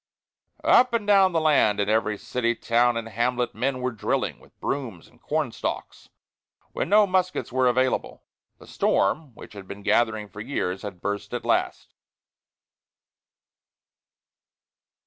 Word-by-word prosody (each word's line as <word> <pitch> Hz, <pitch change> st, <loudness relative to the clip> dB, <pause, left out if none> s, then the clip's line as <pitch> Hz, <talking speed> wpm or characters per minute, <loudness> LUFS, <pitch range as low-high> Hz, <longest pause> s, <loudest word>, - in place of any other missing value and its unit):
Up 250 Hz, -1 st, +5 dB
and 230 Hz, -3 st, 0 dB
down 195 Hz, -2 st, +5 dB
the 165 Hz, -, +1 dB
land, 145 Hz, -10 st, +3 dB
in 100 Hz, -, +1 dB
every 110 Hz, -1 st, +1 dB
city, 120 Hz, +2 st, -1 dB
town, 120 Hz, +1 st, +2 dB
and 115 Hz, -1 st, -4 dB
hamlet, 120 Hz, +3 st, -1 dB
men 130 Hz, 0 st, -2 dB
were 125 Hz, 0 st, -1 dB
drilling 110 Hz, -, -2 dB
with -, -, -23 dB
brooms 115 Hz, -12 st, -4 dB
and -, -, -25 dB
corn -, -, -1 dB
stalks, -, -, -6 dB, 0.6 s
when -, -, -3 dB
no 210 Hz, +1 st, +6 dB
muskets 185 Hz, -6 st, -1 dB
were 130 Hz, 0 st, +2 dB
available. 130 Hz, +1 st, 0 dB, 0.3 s
The -, -, -16 dB
storm, 135 Hz, +5 st, 0 dB
which -, -, -12 dB
had 100 Hz, -2 st, -10 dB
been 100 Hz, +1 st, -9 dB
gathering 110 Hz, -1 st, +1 dB
for 105 Hz, +1 st, -10 dB
years, 95 Hz, -7 st, -3 dB
had 100 Hz, -4 st, -8 dB
burst 100 Hz, 0 st, -3 dB
at -, -, -5 dB
last. -, -, -1 dB
120 Hz, 145 wpm, -25 LUFS, 105-145 Hz, 0.6 s, no